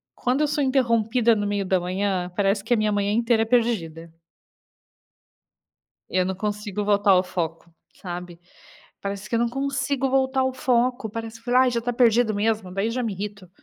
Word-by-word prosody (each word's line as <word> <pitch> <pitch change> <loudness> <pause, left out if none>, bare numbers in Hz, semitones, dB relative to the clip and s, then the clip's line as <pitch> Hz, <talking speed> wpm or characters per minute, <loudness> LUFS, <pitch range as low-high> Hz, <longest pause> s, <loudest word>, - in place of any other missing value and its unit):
Quando 255 +4 0
eu 300 - +3
sou 295 0 0
interrompida 235 -3 +2
no 205 - -1
meio 205 -1 -1
da 185 0 +2
manhã, 185 0 -2
parece 200 0 +1
que 225 - +1
a - - +3
minha 215 0 +1
manhã 205 0 0
inteira 230 0 +2
é - - -3
perdida. 195 -9 0 2.0
Eu 185 -1 +1
não 190 0 -2
consigo 210 0 -3
voltar 205 -1 +3
ao 185 -1 +5
foco, 165 -2 -4 0.3
sabe. 175 -1 -7 0.6
Parece 200 0 -5
que 235 - 0
eu - - +2
não 235 - +2
consigo 270 +1 -1
voltar 265 0 +1
ao 260 0 0
foco, 250 -3 0
parece 225 +1 -7
que 230 - -27
falei: 250 +1 +4
"Ai 255 -1 +3
já 235 - 0
está 245 +1 -3
perdido 235 -2 +3
mesmo." 210 -3 -1
Daí 200 +4 -1
já 250 +2 -2
me 225 -4 -2
irrito, 200 -1 -7
220 Hz, 190 wpm, -24 LUFS, 195-245 Hz, 2.0 s, ao